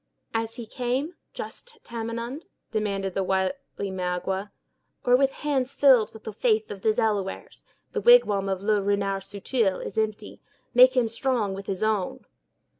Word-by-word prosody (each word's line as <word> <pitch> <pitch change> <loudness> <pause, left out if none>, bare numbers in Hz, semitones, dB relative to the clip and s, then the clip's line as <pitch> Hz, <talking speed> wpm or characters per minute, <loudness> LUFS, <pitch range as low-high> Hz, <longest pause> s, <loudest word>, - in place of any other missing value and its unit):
"As 225 0 -2
he 235 -2 -7
came, 255 +8 -2 0.2
just - - -9
Tamenund," 235 +5 -5 0.2
demanded 200 -3 -1
the 195 - 0
wily 190 +2 +1 0.4
Magua, 190 +2 -2 0.6
"or 245 - +6
with 270 +1 +4
hands 275 -2 -1
filled 260 -6 +5
with 220 - -13
the 220 - -6
faith 220 0 +1
of 200 -2 -7
the 220 - +3
Delawares? 210 -3 -2 0.3
The - - -2
wigwam 210 - +5
of 190 0 -2
Le 210 -1 +2
Renard 195 -1 0
Subtil 200 0 -1
is 200 - -3
empty. 215 -1 -3 0.3
Make 255 +1 +7
him 240 -2 +4
strong 230 -3 0
with 195 0 -7
his 195 +1 -2
own." 215 -4 -1
215 Hz, 155 wpm, -26 LUFS, 195-245 Hz, 0.6 s, Make